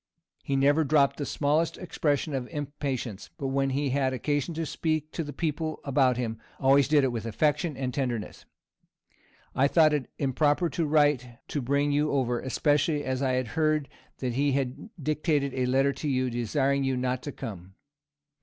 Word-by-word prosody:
He 140 Hz, -, -2 dB
never 145 Hz, +3 st, +4 dB
dropped 140 Hz, -1 st, +3 dB
the 145 Hz, -, -3 dB
smallest 155 Hz, +3 st, +1 dB
expression 150 Hz, -4 st, -1 dB
of 130 Hz, -2 st, -2 dB
impatience; 135 Hz, -, -4 dB
but 135 Hz, -, -3 dB
when 135 Hz, 0 st, +1 dB
he 135 Hz, 0 st, 0 dB
had 135 Hz, -1 st, +1 dB
occasion 145 Hz, +4 st, -1 dB
to 165 Hz, 0 st, -2 dB
speak 155 Hz, +1 st, -2 dB
to 165 Hz, -, -3 dB
the 145 Hz, -, -6 dB
people 155 Hz, +1 st, -2 dB
about 130 Hz, -3 st, +2 dB
him, 115 Hz, -3 st, -3 dB, 0.2 s
always 135 Hz, +1 st, +4 dB
did 150 Hz, -1 st, +4 dB
it 130 Hz, -, +2 dB
with 115 Hz, -1 st, -4 dB
affection 150 Hz, -, 0 dB
and 130 Hz, -2 st, -2 dB
tenderness. 120 Hz, -6 st, -3 dB, 1.1 s
I 135 Hz, +2 st, +3 dB
thought 155 Hz, 0 st, +4 dB
it 145 Hz, -4 st, -1 dB
improper 145 Hz, +4 st, +1 dB
to 165 Hz, -3 st, -1 dB
write 145 Hz, -6 st, +2 dB
to 145 Hz, -, -2 dB
bring 140 Hz, +3 st, +1 dB
you 150 Hz, +1 st, +2 dB
over, 125 Hz, -3 st, +1 dB
especially 145 Hz, +2 st, +1 dB
as 130 Hz, 0 st, -2 dB
I 130 Hz, -1 st, +1 dB
heard 155 Hz, +4 st, 0 dB, 0.3 s
that 125 Hz, -2 st, -2 dB
he 140 Hz, +2 st, +1 dB
had 135 Hz, -, -2 dB
dictated 150 Hz, -2 st, 0 dB
a 130 Hz, -1 st, 0 dB
letter 135 Hz, +2 st, +3 dB
to 150 Hz, -, -5 dB
you, 130 Hz, -2 st, 0 dB
desiring 135 Hz, +4 st, 0 dB
you 135 Hz, -1 st, 0 dB
not 125 Hz, 0 st, -1 dB
to 145 Hz, -, -5 dB
come. 95 Hz, -6 st, -8 dB
140 Hz, 175 wpm, -27 LUFS, 130-150 Hz, 1.1 s, never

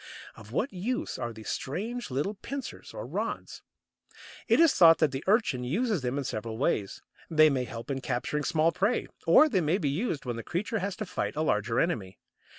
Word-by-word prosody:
Of 110 Hz, 0 st, -13 dB
what 215 Hz, -, -1 dB
use 220 Hz, +8 st, -3 dB
are 120 Hz, -, -3 dB
these 110 Hz, -1 st, -8 dB
strange 220 Hz, -, -3 dB
little 145 Hz, +10 st, -1 dB
pincers 270 Hz, +6 st, -7 dB
or -, -, -6 dB
rods? -, -, -4 dB, 0.9 s
It -, -, +4 dB
is 330 Hz, -3 st, +6 dB
thought 165 Hz, -2 st, +7 dB
that 155 Hz, -4 st, +2 dB
the 135 Hz, +1 st, -4 dB
Urchin 195 Hz, -, +2 dB
uses 200 Hz, -, 0 dB
them 125 Hz, +2 st, -2 dB
in 140 Hz, -, -1 dB
several 110 Hz, -3 st, -4 dB
ways. 110 Hz, -, -1 dB, 0.3 s
They 155 Hz, -1 st, +6 dB
may 130 Hz, -2 st, 0 dB
help 115 Hz, +3 st, -7 dB
in 135 Hz, -1 st, -2 dB
capturing 145 Hz, +4 st, -2 dB
small 160 Hz, +3 st, +2 dB
prey, 200 Hz, +8 st, 0 dB, 0.2 s
or 310 Hz, -, +7 dB
they 205 Hz, -11 st, +1 dB
may 160 Hz, +3 st, +2 dB
be 155 Hz, -8 st, -1 dB
used 155 Hz, -, -2 dB
when 120 Hz, -2 st, -3 dB
the 115 Hz, -, -5 dB
creature 205 Hz, +6 st, -2 dB
has 200 Hz, 0 st, -3 dB
to 215 Hz, -, -4 dB
fight 180 Hz, -, -3 dB
a 155 Hz, -, 0 dB
larger 115 Hz, -3 st, +1 dB
enemy. 105 Hz, -, -1 dB
155 Hz, 200 wpm, -29 LUFS, 125-200 Hz, 0.9 s, thought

